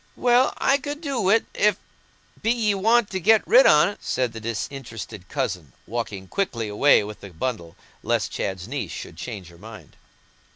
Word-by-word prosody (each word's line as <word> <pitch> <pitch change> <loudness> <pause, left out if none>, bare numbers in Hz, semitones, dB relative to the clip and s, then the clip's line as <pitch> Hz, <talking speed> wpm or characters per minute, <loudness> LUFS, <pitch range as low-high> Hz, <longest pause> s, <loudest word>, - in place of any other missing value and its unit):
"Well, 245 +1 +3
I 275 +1 +2
could 290 +2 -5
do 280 -6 -2
wi't, 205 +4 +3
if 210 -1 +3
so - - -29 0.6
be 225 - 0
ye 225 -4 +1
want 220 +3 +2
to 190 - -2
get 215 +4 +4
rid - - +7
on't," 205 - +4
said 125 -3 -1
the 115 - -7
disinterested 115 -3 -6
cousin, 85 - -3
walking 105 -5 -5
quickly 120 - -2
away 105 +5 +4
with 105 +1 -8
the 100 - -9
bundle, 85 -2 -4 0.3
lest - - 0
Chad's 95 -2 -4
Bess 135 +4 -4
should - - -8
change 100 -8 -7
her 85 -1 -17
mind. 110 -6 -13
125 Hz, 175 wpm, -24 LUFS, -, 0.6 s, rid